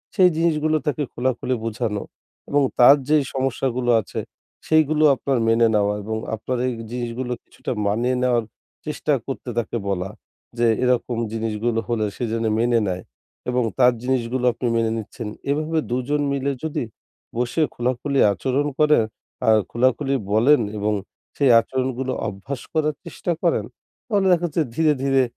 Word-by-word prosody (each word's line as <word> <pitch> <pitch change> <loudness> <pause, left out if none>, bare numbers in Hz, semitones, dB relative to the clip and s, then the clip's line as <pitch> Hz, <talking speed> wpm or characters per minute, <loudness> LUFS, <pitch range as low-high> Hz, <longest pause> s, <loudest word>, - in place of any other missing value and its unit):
সেই 185 -3 +6
জিনিসগুলো 155 -2 +2
তাকে 150 0 0
খোলাখুলি 130 +1 -1
বোঝানো 110 -2 -2 0.5
এবং 145 0 +3 0.2
তার 125 +3 +9
যেই 150 -1 +4
সমস্যাগুলো 130 -2 -1
আছে - - -6 0.5
সেইগুলো 155 -1 +3
আপনার 135 0 -1
মেনে 115 +1 +4
নেওয়া 105 0 +2
এবং 110 +2 -3 0.2
আপনার 125 +4 -3
এই 125 - -1 0.2
জিনিসগুলো 120 +1 -3
কিছুটা - - -6 0.2
মানিয়ে 120 +5 +1
নেওয়ার 120 -2 +2 0.4
চেষ্টা 150 0 -1
করতে 135 -2 -5
তাকে 120 0 -1
বলা 95 -1 -1 0.5
যে 120 - +2 0.2
এরকম 125 -1 +1 0.2
জিনিসগুলো 115 +1 -1
হলে 115 -2 +1
সে - - -4
যেন 115 0 -1
মেনে 120 0 +3
নেয় 90 -1 -3 0.5
এবং 125 0 +1 0.2
তার 125 -1 +6
জিনিসগুলো 125 -1 0
আপনি 125 - -3
মেনে 115 -1 +1
নিচ্ছেন। 110 +1 -6 0.2
এভাবে 155 +2 0
২ 125 +2 0
জন 150 0 +1
মিলে 140 0 0
যদি 160 -4 -2 0.5
বসে 125 +6 0
খোলাখুলি 125 +3 -1
আচরণ 130 +8 0
করেন 150 -5 +5 0.4
আর 110 -1 +6
খোলাখুলি 130 +3 +1 0.2
বলেন 120 +5 +5 0.2
এবং 105 +1 0 0.4
সেই 140 -3 +4
আচরণগুলো 130 +2 -2 0.2
অভ্যাস 105 +7 -6
করার 155 -2 +1
চেষ্টা 170 +1 -4
করেন 165 - +2 0.4
তাহলে 200 -4 +2
দেখা 175 -1 +3
যাচ্ছে 160 +1 -1
ধীরে-ধীরে 135 -4 +3
125 Hz, 145 wpm, -22 LUFS, 115-145 Hz, 0.5 s, তার